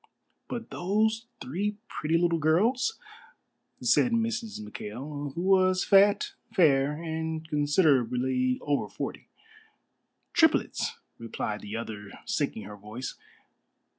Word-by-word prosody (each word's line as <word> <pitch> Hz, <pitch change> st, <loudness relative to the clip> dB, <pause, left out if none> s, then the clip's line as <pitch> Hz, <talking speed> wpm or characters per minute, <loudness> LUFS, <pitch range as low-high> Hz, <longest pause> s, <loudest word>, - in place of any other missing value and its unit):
"But 235 Hz, -2 st, -6 dB
those 220 Hz, +5 st, 0 dB
three 200 Hz, +11 st, -2 dB
pretty 160 Hz, +2 st, 0 dB
little 170 Hz, -1 st, +2 dB
girls?" 230 Hz, -, +2 dB, 0.9 s
said 250 Hz, -, +4 dB
Mrs. 230 Hz, -1 st, -1 dB
McKail, 135 Hz, +7 st, -6 dB
who 170 Hz, -, -2 dB
was 185 Hz, -1 st, +4 dB
fat, 200 Hz, +1 st, +4 dB, 0.2 s
fair, 145 Hz, -7 st, +4 dB
and 160 Hz, 0 st, -4 dB
considerably 130 Hz, -5 st, +2 dB
over 145 Hz, -1 st, 0 dB
forty. -, -, -6 dB, 1.1 s
"Triplets," 320 Hz, -1 st, +2 dB, 0.2 s
replied 110 Hz, -2 st, -4 dB
the 105 Hz, +1 st, -6 dB
other, 105 Hz, -3 st, -6 dB, 0.2 s
sinking -, -, -1 dB
her 105 Hz, 0 st, -9 dB
voice. 105 Hz, +5 st, -6 dB
160 Hz, 105 wpm, -28 LUFS, 130-200 Hz, 1.1 s, said